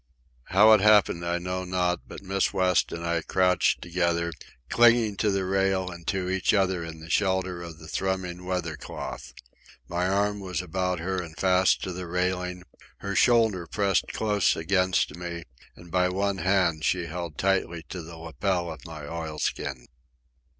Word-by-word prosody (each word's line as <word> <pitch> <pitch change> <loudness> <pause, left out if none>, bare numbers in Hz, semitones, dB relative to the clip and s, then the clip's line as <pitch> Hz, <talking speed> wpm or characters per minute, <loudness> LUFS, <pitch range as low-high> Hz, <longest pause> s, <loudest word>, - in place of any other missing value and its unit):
How 105 +4 +6
it 105 - +5
happened 105 -5 +4
I 85 0 0
know 90 +1 -3
not, 90 -1 -1
but - - -10
Miss 95 0 0
West 95 -2 +2
and 85 0 -5
I 85 0 0
crouched 90 +2 +2
together, 85 -1 0 0.3
clinging 120 -3 +4
to 105 - +1
the 95 -1 0
rail 95 -1 +1
and 85 -1 -11
to 95 -1 -1
each 95 +2 +1
other 95 -3 +1
in 80 -1 -8
the 80 - -11
shelter 95 -2 0
of 85 -2 -8
the 80 0 -12
thrumming 90 0 -3
weather 90 -3 -2
cloth. - - -7 0.6
My 90 +1 -1
arm 100 +2 +1
was 95 -2 -4
about 90 +1 -1
her 95 +1 -2
and 80 -2 -10
fast 95 0 +3
to 90 - -3
the 90 0 -6
railing; 90 0 -2 0.4
her 100 0 -3
shoulder 110 -8 +3
pressed 100 -2 +1
close 105 -3 +1
against 90 -2 +1
me, 85 -1 -6 0.3
and 85 -1 -14
by 90 +1 +2
one 100 +1 -1
hand 95 -5 +2
she 90 -2 +1
held 85 -1 -6
tightly 95 -4 0
to 90 - -5
the 80 0 -10
lapel 85 +2 -2
of - - -14
my 80 -2 -8
oilskin. 75 -4 -4
90 Hz, 170 wpm, -26 LUFS, 85-95 Hz, 0.6 s, How